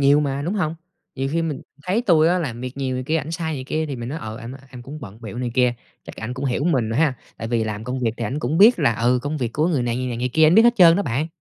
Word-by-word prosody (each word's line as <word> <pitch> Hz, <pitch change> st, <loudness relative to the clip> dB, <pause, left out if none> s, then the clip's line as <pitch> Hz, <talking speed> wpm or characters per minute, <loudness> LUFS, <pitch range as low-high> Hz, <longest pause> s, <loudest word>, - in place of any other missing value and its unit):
nhiều 140 Hz, +2 st, +5 dB
mà, 140 Hz, -1 st, -2 dB
đúng 180 Hz, +7 st, -2 dB
hông? 165 Hz, -5 st, -1 dB, 0.4 s
Nhiều 135 Hz, 0 st, -2 dB
khi 165 Hz, 0 st, +1 dB
mình 150 Hz, -5 st, -3 dB, 0.2 s
thấy 200 Hz, +8 st, 0 dB
tui 165 Hz, -7 st, +4 dB
á 180 Hz, +1 st, +2 dB
làm 125 Hz, -8 st, -4 dB
việc 125 Hz, +1 st, -6 dB
nhiều 130 Hz, -2 st, -2 dB
này 130 Hz, 0 st, -3 dB
kia, 160 Hz, +3 st, 0 dB
ảnh 160 Hz, 0 st, -3 dB
sai 160 Hz, -1 st, -3 dB
này 130 Hz, -2 st, -5 dB
kia 155 Hz, +3 st, -2 dB
thì 140 Hz, -3 st, -5 dB
mình 120 Hz, 0 st, -6 dB
nói: 155 Hz, +4 st, -4 dB
"Ờ, 110 Hz, 0 st, -7 dB
anh 115 Hz, +3 st, -8 dB
ơi, 135 Hz, -, -11 dB
em 125 Hz, -2 st, -10 dB
cũng 145 Hz, +4 st, -9 dB
bận 110 Hz, -3 st, -10 dB
bịu 115 Hz, +1 st, -7 dB
này 125 Hz, -1 st, -2 dB
kia," 125 Hz, -1 st, +3 dB, 0.3 s
chắc -, -, -10 dB
ảnh 120 Hz, +3 st, -5 dB
cũng 135 Hz, +2 st, -5 dB
hiểu 135 Hz, +3 st, 0 dB
mình 130 Hz, -10 st, +1 dB
ha? 140 Hz, +3 st, +2 dB, 0.2 s
Tại 115 Hz, -, -5 dB
vì 115 Hz, -2 st, 0 dB
làm 110 Hz, 0 st, -4 dB
công 125 Hz, +1 st, -3 dB
việc 115 Hz, -3 st, +1 dB
thì 115 Hz, -, -3 dB
ảnh 130 Hz, +8 st, -2 dB
cũng 155 Hz, +2 st, -1 dB
biết 220 Hz, +1 st, +7 dB
là, 135 Hz, -7 st, +2 dB
ừ, 120 Hz, +3 st, +2 dB
công 150 Hz, +2 st, -2 dB
việc 120 Hz, -5 st, -3 dB
của 155 Hz, +3 st, +1 dB
người 145 Hz, -8 st, +1 dB
này, 120 Hz, 0 st, -1 dB
người 130 Hz, 0 st, -2 dB
này, 120 Hz, -2 st, -3 dB
người 125 Hz, +1 st, -1 dB
kia, 160 Hz, 0 st, +5 dB
ảnh 165 Hz, -, +5 dB
biết 225 Hz, -, +8 dB
hết 240 Hz, 0 st, +5 dB
trơn 170 Hz, -2 st, +7 dB
đó 200 Hz, -, +1 dB
bạn! 135 Hz, +4 st, -1 dB
135 Hz, 330 wpm, -22 LUFS, 120-160 Hz, 0.4 s, biết